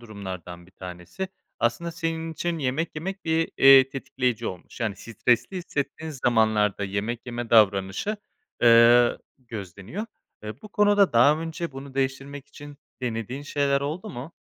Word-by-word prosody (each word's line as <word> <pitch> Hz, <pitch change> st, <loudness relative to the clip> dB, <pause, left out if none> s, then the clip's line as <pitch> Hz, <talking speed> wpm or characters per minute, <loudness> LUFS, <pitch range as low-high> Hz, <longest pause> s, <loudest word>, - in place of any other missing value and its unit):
durumlardan 95 Hz, -6 st, -8 dB
1 -, -, -20 dB
tanesi. 90 Hz, -, -7 dB, 0.3 s
Aslında 165 Hz, +9 st, -1 dB
senin 165 Hz, 0 st, -3 dB
için 165 Hz, +2 st, -2 dB
yemek 145 Hz, +4 st, -2 dB
yemek 190 Hz, +6 st, -5 dB
bir, 160 Hz, 0 st, +1 dB
eee, 135 Hz, -1 st, +8 dB
tetikleyici 130 Hz, -3 st, -2 dB
olmuş, 95 Hz, +6 st, -8 dB
yani, 110 Hz, -4 st, -1 dB
stresli 120 Hz, -, 0 dB
hissettiğin 155 Hz, -2 st, -4 dB
zamanlarda 110 Hz, -6 st, +1 dB
yemek 105 Hz, +5 st, -3 dB
yeme 120 Hz, -1 st, -5 dB
davranışı, 105 Hz, -, +3 dB, 0.5 s
eee, 120 Hz, +1 st, +6 dB, 0.2 s
gözleniyor. 115 Hz, -, -7 dB, 0.4 s
Eee, 110 Hz, +4 st, -8 dB
bu 215 Hz, -, -10 dB
konuda 205 Hz, -3 st, +3 dB
daha 140 Hz, +6 st, +5 dB
önce 165 Hz, -1 st, -5 dB
bunu 135 Hz, 0 st, -9 dB
değiştirmek 135 Hz, +1 st, -3 dB
için 145 Hz, 0 st, -12 dB, 0.3 s
denediğin 120 Hz, +3 st, -3 dB
şeyler 140 Hz, -1 st, +1 dB
oldu 165 Hz, +9 st, -4 dB
mu? 135 Hz, +5 st, -8 dB
130 Hz, 135 wpm, -25 LUFS, 110-160 Hz, 0.5 s, eee